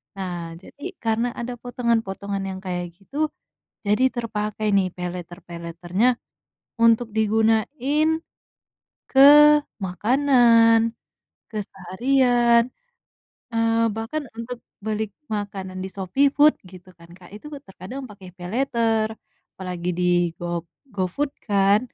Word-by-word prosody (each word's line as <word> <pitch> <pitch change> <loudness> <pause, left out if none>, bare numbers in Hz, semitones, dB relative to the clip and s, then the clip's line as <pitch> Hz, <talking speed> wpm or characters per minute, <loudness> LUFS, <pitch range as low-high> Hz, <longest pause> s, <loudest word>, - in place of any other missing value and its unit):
Nah 190 -2 -4 0.3
jadi 285 - -15 0.2
karena 225 +2 +1
ada 240 +1 -4
potongan-potongan 225 -5 -2
yang 190 0 -6
kayak 180 -1 -2
gitu, 205 +9 -11 0.7
jadi 210 +5 +3
terpakai 215 -2 -3
nih 190 -2 +3
paylater-paylater-nya 175 +2 -3 0.8
untuk 230 0 +5
digunain 225 +8 +2 1.0
ke 265 - +4 0.7
makanan, 230 - +4 0.6
keseharian, 235 +4 +2 0.9
eee, 230 0 +2 0.2
bahkan 225 +8 -3
untuk 230 +1 -6 0.3
beli 215 0 -1 0.3
makanan 195 -2 -5
di - - -4
Shopee 200 +9 +2
Food 300 +1 +6 0.2
gitu 185 -1 -14
kan 170 - -16
Kak, 175 - -15
itu 215 - -11 0.2
terkadang 200 +8 -8
pakai 200 -5 -12
paylater, 225 +2 0 0.5
apalagi 180 -2 -5
di - - 0 0.4
go 175 -1 -3 0.3
GoFood 200 +10 -1 0.2
kan, 200 +1 +4
215 Hz, 100 wpm, -23 LUFS, 185-240 Hz, 1.0 s, Food